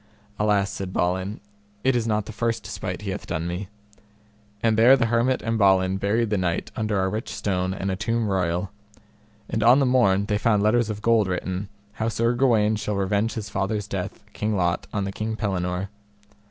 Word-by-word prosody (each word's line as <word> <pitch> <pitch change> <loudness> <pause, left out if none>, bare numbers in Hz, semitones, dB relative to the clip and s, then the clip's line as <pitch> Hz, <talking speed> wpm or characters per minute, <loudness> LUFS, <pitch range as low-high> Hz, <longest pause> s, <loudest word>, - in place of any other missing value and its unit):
Alas, 105 -2 +2
said 95 -2 -5
Balin, 95 +3 -1 0.4
it 130 -1 +3
is 115 -2 0
not 105 -2 0
the 110 - -7
first 115 0 -1
despite 90 +2 -5
he 100 - -3
hath 100 - -6
done 85 -1 -2
me; 90 +3 -4 1.0
and 115 -1 +3
there 120 +5 +7
the 120 - +2
hermit 120 +3 +1
and 115 0 -1
Balin 95 -1 +4
buried 105 +3 0
the 105 - +1
knight 85 -2 -1
under 105 -2 0
a - - +1
rich 110 +4 -3
stone 95 -2 -1
and 95 +1 -2
a - - -1
tomb 115 +3 -1
royal. 90 -1 -1 0.8
And 110 - -2
on 120 +4 +7
the 140 - +3
morn 100 -6 +3
they 105 0 0
found 105 -2 +2
letters 115 +1 +3
of 105 0 -5
gold 115 -3 +3
written, 95 +1 -3 0.2
how 110 +1 -1
Sir 115 +1 +1
Gawaine 110 -4 +3
shall 105 0 -2
revenge 100 +3 0
his 105 -2 -5
father's 100 +1 -1
death, 95 -3 -5
King 105 0 -1
Lot, 85 0 0
on 100 - -1
the 95 - -3
King 110 +2 -3
Pellinore. 95 -2 -2
105 Hz, 195 wpm, -24 LUFS, 95-115 Hz, 1.0 s, there